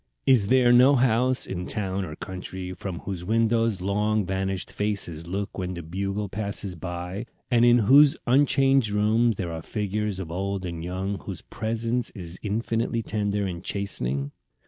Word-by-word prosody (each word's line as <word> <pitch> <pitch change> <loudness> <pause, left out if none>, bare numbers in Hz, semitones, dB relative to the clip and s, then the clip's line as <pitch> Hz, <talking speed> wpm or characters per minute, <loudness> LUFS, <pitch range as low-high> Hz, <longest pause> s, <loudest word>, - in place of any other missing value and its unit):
Is 120 -7 +5
there 125 0 +5
no 130 +3 +7
house 125 +1 +2
in 90 -1 -5
town 95 -2 -2
or 75 -3 -7
country 95 0 -6
from 90 -1 -6
whose 90 -3 -5
windows 115 0 +1
long 105 +2 +1
vanished 95 0 -2
faces 95 -6 -3
look 100 +2 -4
when 90 0 -3
the 85 - -6
Bugle 100 +5 -3
passes 100 -1 -3
by, 90 +5 -5 0.2
and 120 -1 +4
in 120 0 +6
whose 140 +5 +7
unchanged 135 -2 +3
rooms 110 +3 +2
there 90 -3 -4
are 80 0 -5
figures 105 +2 -2
of 85 -4 -6
old 95 +1 -2
and 85 -2 -5
young 95 +3 -3
whose 95 -3 -7
presence 115 +2 -2
is 90 -3 -5
infinitely 115 +2 -1
tender 105 -1 -1
and 90 -2 -5
chastening? 70 -10 -2
100 Hz, 160 wpm, -25 LUFS, 90-115 Hz, 0.2 s, no